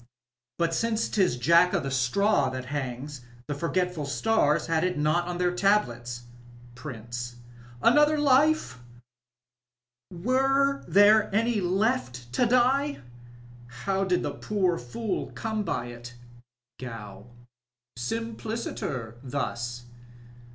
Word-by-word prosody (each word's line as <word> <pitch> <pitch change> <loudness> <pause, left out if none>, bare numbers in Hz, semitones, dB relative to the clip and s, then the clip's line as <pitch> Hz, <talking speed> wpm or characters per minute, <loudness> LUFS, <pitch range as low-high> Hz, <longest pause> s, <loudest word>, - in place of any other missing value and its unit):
But 170 -1 0
since 225 +4 0
'tis 185 - +1
Jack 170 +7 +4
of - - +1
the 135 - -3
Straw 135 +4 +2
that 130 0 -5
hangs, 135 0 -4 0.2
the 145 - -3
forgetful 170 0 -1
stars 150 -2 +1
nad 165 -1 +1
it 180 -2 0
not 155 +4 +1
on 175 0 -3
their 180 0 +1
tablets. 120 - 0 0.5
PRINCB. 120 -2 -7 0.2
— 120 0 -19
^Another 295 +1 +5
luel 295 - +3 1.3
Were 270 +8 +1
there 205 +1 +5
any 225 -1 +2
left 180 - -1
to 245 - +2
die? 255 - +2 0.6
How 190 +10 -2
did 185 -2 +1
the - - -2
poor 190 -5 0
fool 185 - -4
come 220 -1 -2
by 165 -10 -2
it? 120 0 -10 0.6
Gow. 115 -4 -8 0.3
— 120 0 -66
Simpliciter 215 - -4
thus. 120 -3 -4
170 Hz, 115 wpm, -27 LUFS, -, 1.3 s, ^Another